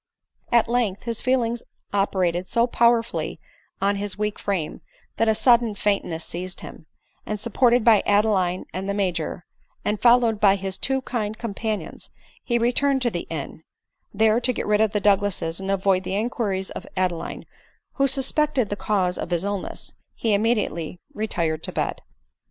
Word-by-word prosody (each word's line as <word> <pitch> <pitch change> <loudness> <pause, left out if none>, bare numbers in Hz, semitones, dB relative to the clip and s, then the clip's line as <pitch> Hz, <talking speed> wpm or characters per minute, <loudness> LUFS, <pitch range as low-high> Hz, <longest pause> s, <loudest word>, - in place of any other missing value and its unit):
At 235 -1 +4
length 230 -5 0
his 230 -1 -3
feelings 240 -2 +1 0.3
operated 185 -3 +1
so 235 0 +2
powerfully 235 -1 +1 0.4
on 200 +1 +1
his 205 0 -3
weak 210 0 -2
frame, 185 -6 -2 0.4
that 225 - +2
a 220 - +4
sudden 235 -2 +4
faintness 195 -6 -1
seized 180 +1 -6
him, 160 - -11 0.4
and 210 -1 -4
sup 230 +1 -6
ported 245 -2 +4
by 220 -3 +6
Adeline 200 -3 +2
and 190 +2 -4
the 200 - -1
Major, 175 -4 -2 0.4
and 210 0 -1
followed 235 -3 +5
by 200 -2 +5
his 195 -1 -3
two 265 0 0
kind 220 -4 -3
companions, 215 -5 -4 0.3
he 240 - +1
returned 260 +3 +2
to 240 - +1
the 175 - -4
inn; 155 -1 -5 0.5
there, 220 +2 +3
to 250 - +1
get - - -3
rid 210 0 +2
of 220 -2 +3
the 210 - 0
Douglases 195 -5 +1
and 195 0 -5
avoid 195 -1 +2
the 190 - -3
inquiries 205 -4 -1
of - - -7
Ade 185 -1 +2
line, 170 - -6 0.5
who 275 -1 +2
suspected 270 -2 +2
the 205 - -1
cause 190 -4 0
of - - -4
his 175 0 0
illness, 200 -1 -4 0.2
he 230 - -2
immedi 215 +2 +2
ately 165 +2 -6 0.2
retired 170 -7 -1
to - - -5
bed. - - -2
205 Hz, 170 wpm, -24 LUFS, 190-235 Hz, 0.5 s, by